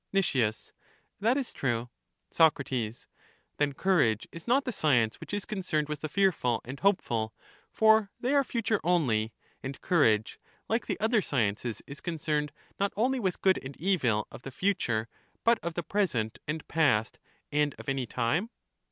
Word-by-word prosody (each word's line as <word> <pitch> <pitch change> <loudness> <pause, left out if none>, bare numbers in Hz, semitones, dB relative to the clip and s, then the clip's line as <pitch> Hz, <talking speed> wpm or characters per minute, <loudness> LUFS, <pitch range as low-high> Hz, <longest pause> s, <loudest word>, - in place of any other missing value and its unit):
Nic, 195 -1 +3 0.9
That 230 +6 +2
is 270 -4 -3
true. 120 -2 -1 0.4
Soc, 160 -3 +5 1.0
Then 145 -1 +1
courage 145 - +2
is 165 +4 -10
not 270 +4 +3
the 255 - -1
science 120 - +2
which - - -9
is 205 -1 -2
con 210 - -4
cerned 155 -5 -1
with 150 -1 -4
the 155 - -3
fearful 155 - +2
and 135 +3 -7
hopeful, 120 - +1 0.3
for 220 -2 +4
they 255 +3 0
are 280 -1 +5
future 225 -4 0
only; 125 -11 +2 0.3
and 135 +1 -6
courage, 110 - +2 0.3
like 225 +2 0
the - - -2
other 220 +1 +3
sciences, 115 - -1
is 140 +1 -9
concerned 150 -3 -1 0.3
not 200 0 +1
only 255 +4 +2
with 190 -6 -1
good 190 -1 +3
and 135 +1 -9
evil 135 - +1
of - - -10
the 135 - -7
future, 125 - 0 0.4
but 235 0 +4
of 170 -1 -4
the 175 - -2
present, 155 - -1
and 155 +1 -4
past, 140 -9 +2 0.3
and 150 0 +1
of - - -11
any 135 -2 -1
time? 130 - 0
155 Hz, 165 wpm, -29 LUFS, 125-200 Hz, 1.0 s, Soc